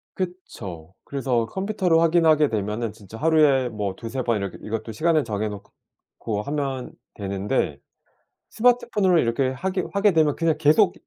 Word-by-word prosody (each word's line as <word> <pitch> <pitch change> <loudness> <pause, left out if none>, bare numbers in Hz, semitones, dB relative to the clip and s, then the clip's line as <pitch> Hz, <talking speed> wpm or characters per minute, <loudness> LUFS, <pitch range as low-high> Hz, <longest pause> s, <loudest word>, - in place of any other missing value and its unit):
그쵸. 100 - -6
그래서 130 -4 -1
컴퓨터로 190 - +1
확인하게 160 -2 +4
되면은 105 0 -2
진짜 105 0 -12
하루에 150 -3 +4
뭐 105 -4 -3
2-3 120 +5 -4
번 120 -2 +1
이렇게 100 -2 -5
이것도 110 +1 -5
시간을 155 +4 +2
정해 105 0 -2
놓고 105 +1 -8
하면 135 0 -3 0.2
되는데 100 -1 -2 0.7
스마트폰으로 235 -6 +3
이렇게 125 +1 +1
하게 185 +8 -2
하게 200 +2 +3
되면 155 -3 +3
그냥 165 -2 +1
계속 165 +5 +4
135 Hz, 325 characters per minute, -24 LUFS, 110-170 Hz, 0.7 s, 확인하게